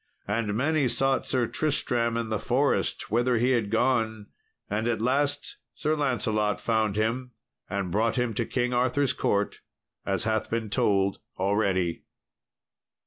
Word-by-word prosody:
And 105 0 -1
many 145 +3 +2
sought 135 +3 +1
Sir 125 -2 +2
Tristram 120 -4 0
in 115 -1 -2
the 110 -2 -1
forest 135 -3 0
whither 120 +2 +2
he 125 +3 +2
had 115 -5 +1
gone, 110 -2 +1 0.4
and 110 +3 -1
at 115 -3 0
last 140 +4 0 0.2
Sir 155 +1 0
Lancelot 110 -7 0
found 110 -3 +1
him, 120 +4 -1 0.4
and 95 -2 -2
brought 110 +4 +1
him 125 -3 0
to 115 +2 -1
King 125 -1 0
Arthur's 130 +2 +2
court, 100 0 0 0.4
as 95 +3 -1
hath 110 0 0
been 110 -2 -2
told 100 -1 +2 0.2
already. 95 -3 +1
115 Hz, 140 wpm, -27 LUFS, 105-125 Hz, 0.4 s, many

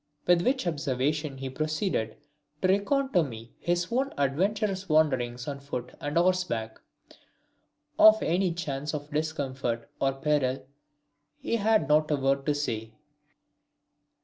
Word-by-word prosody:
With 175 -1 +4
which 255 +4 +1
observation 145 -2 -1
he 135 0 -5
proceeded 155 - -1 0.5
to - - +4
recount 265 +9 +1
to 180 - +5
me 115 -6 -7
his 175 +1 0
own 265 +3 0
adventurous 190 +8 0
wanderings 130 -6 +1
on 140 -1 -4
foot 125 -3 -6
and 145 +2 -2
horseback. 170 -12 0 1.2
Of 215 0 +8
any 180 +2 +1
chance 150 -3 -3
of 145 0 -7
discomfort 135 -6 -2
or 135 0 +1
peril 135 -2 0 0.7
he 230 - -1
had 220 0 +2
not 155 0 +3
a 150 - +3
word 135 0 0
to 150 - +2
say. 115 -6 -3
150 Hz, 130 wpm, -28 LUFS, 135-180 Hz, 1.2 s, Of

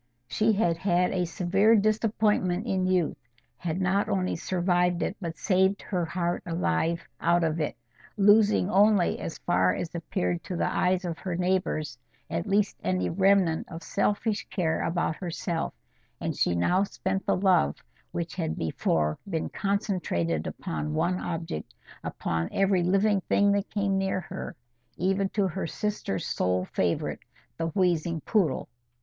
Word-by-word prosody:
She 215 - +2
had 175 -5 +1
had 180 0 +2
a 180 -1 0
severe 195 +6 +3
disappointment 210 -2 +1
in 185 -5 0
youth, 180 -4 +1 0.4
had 170 +5 -3
not 190 +2 +1
only 185 -1 0
survived 175 -1 +1
it, - - -2
but 165 -2 -4
saved 190 0 +2
her 180 -3 -1
heart 175 +1 -1
alive 165 - -1
out 170 0 +3
of 160 0 0
it, 150 - -2 0.4
losing 205 -1 +5
only, 205 -2 +4
as 165 - -5
far 90 +1 +2
as 165 - -4
appeared 90 - -2
to 180 - -4
the - - 0
eyes 185 0 +1
of 170 -2 -4
her 180 -3 -3
neighbours 175 -7 -1 0.3
at 165 +4 -2
least, 200 +1 +1
any 90 -1 0
remnant 190 - +3
of 165 0 -7
selfish 205 +2 0
care 165 -5 0
about 170 -2 -1
herself; 170 -1 -3 0.5
and - - -2
she 85 - +1
now 175 - +2
spent 195 -1 -2
the - - +3
love 185 - +3 0.4
which 170 -1 -3
had 160 -3 -2
before 75 -1 0
been 165 -4 -2
concentrated 180 - -1
upon 75 -1 -4
one 180 - +1
object, 165 - -5 0.3
upon 80 0 -2
every 195 -2 +2
living 195 +3 +2
thing 200 0 +4
that 200 0 0
came 200 -2 0
near 190 -1 0
her, - - -7 0.4
even 195 +2 +1
to 200 -1 +1
her 185 0 -3
sister's 205 - -3
sole 90 0 0
favourite, 90 -2 -1 0.4
the 165 - 0
wheezing 170 -2 +1
poodle. 180 - +1
180 Hz, 150 wpm, -27 LUFS, 160-195 Hz, 0.5 s, losing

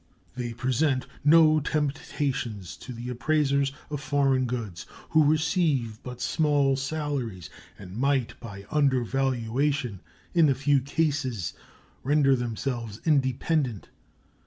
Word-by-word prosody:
They 120 -2 -4
present 130 +2 0 0.2
no 155 +1 +6
temptations 135 - -2
to - - -9
the 120 +1 -6
appraisers 140 +1 +1 0.2
of 145 -2 -3
foreign 135 -2 +2
goods, 115 -9 -5 0.2
who 155 - +5
receive 150 - +1
but 125 -1 -8
small 140 +1 +2
salaries, 135 - -3 0.3
and 95 -1 -10
might 135 0 +1
by 100 -4 -9
undervaluation 135 -3 0 0.3
in 165 -4 +5
a 135 - +3
few 140 +1 +3
cases 135 - -1 0.5
render 140 0 +3
themselves 120 -2 -3
independent. 135 - +1
135 Hz, 110 wpm, -27 LUFS, 120-145 Hz, 0.5 s, no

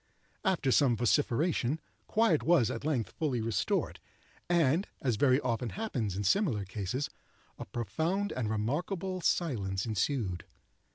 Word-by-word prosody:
After 180 -9 +1
some 125 -4 +4
vociferation, 125 - +1 0.3
quiet 215 -9 +3
was 155 -10 +3
at 115 - -5
length 140 -7 -1
fully 145 -7 -1
restored, 110 -4 -1 0.5
and, 170 +1 +3
as 125 -4 0
very 130 +4 +4
often 120 -1 -1
happens 125 - -3
in 100 - -2
similar 115 - +2
cases, 105 +9 -3 0.5
a - - -5
profound 160 - -1
and 115 -4 -2
remarkable 170 - -2
silence 100 - 0
ensued. 110 -4 -1
130 Hz, 125 wpm, -31 LUFS, 110-165 Hz, 0.5 s, some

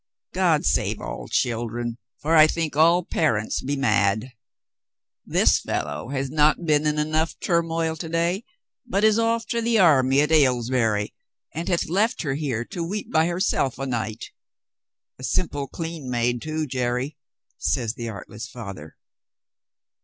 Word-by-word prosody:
God - - +2
save - - +1
all - - -6
children, 120 0 -2 0.2
for 160 +3 +2
I 155 -1 +8
think 160 -2 -2
all 170 +4 +5
par 155 -9 +1
ents 105 +1 -2
be 140 +2 -2
mad. 110 -2 +1 1.0
This - - +4
fellow - - -4
has 135 -1 -2
not 155 +3 +3
been 150 -1 +2
in 150 0 0
enough 155 +2 0
turmoil 165 -2 0
to 160 0 -6
day, 170 +5 0 0.4
but 225 -5 -1
is 220 0 +5
off 230 0 +1
to 235 - 0
the 230 0 +2
army 140 -7 +5
at 150 +1 0
Aylesbury, 120 -7 +2 0.4
and 165 +3 -4
hath 175 -2 +1
left 210 +8 +1
her 140 -4 -1
here 135 -6 -2
to 170 - -5
weep 200 +5 -4
by 160 +1 +3
herself 175 -8 0
a 135 - -3
night. 110 -4 -4 0.9
A - - -10
simple, 145 -2 -1
clean 160 -3 -6
maid, 120 0 0
too, 155 0 -2
Jerry," 125 +1 -2 0.4
says 115 -4 0
the 120 -3 -5
artless 105 +1 -8
father. 100 -10 -9
145 Hz, 155 wpm, -24 LUFS, 120-165 Hz, 1.0 s, I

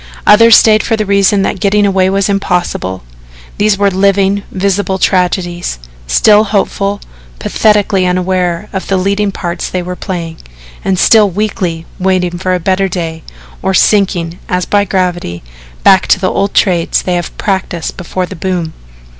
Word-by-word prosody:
Others 230 +2 +7
stayed 215 -1 +4
for 225 - 0
the 215 - -1
reason 200 0 +2
that 195 - -2
getting 205 +1 +2
away 190 -1 +2
was 195 0 0
impossible. 180 - -2 0.6
These 205 -1 +2
were 200 0 +2
living, 195 +1 +1
visible 195 0 -1
tragedies 180 - -1 0.3
still 210 - +4
hopeful, 200 -1 -1 0.4
pathetically 205 - +1
unaware 180 +1 -1
of 190 - -4
the 195 - 0
leading 200 +2 0
parts 175 -2 -4
they 180 -1 -3
were 180 +1 -5
playing, 170 -4 -5 0.5
and 190 -1 0
still 215 +2 +4
weakly 185 -4 -3
waiting 180 -2 0
for 185 0 0
a - - -2
better 190 +2 0
day 165 -3 -4 0.4
or 190 0 0
sinking, 180 -5 +1
as 180 -1 -1
by 205 0 +1
gravity, 175 - -2 0.4
back 190 -1 +5
to - - +3
the 185 - 0
old 200 0 -1
trades 175 -4 +1
they 180 - -1
had 175 -2 -4
practised 190 -4 -3
before 185 0 -4
the 190 - -9
boom. 175 -2 -3
190 Hz, 155 wpm, -12 LUFS, 180-200 Hz, 0.6 s, Others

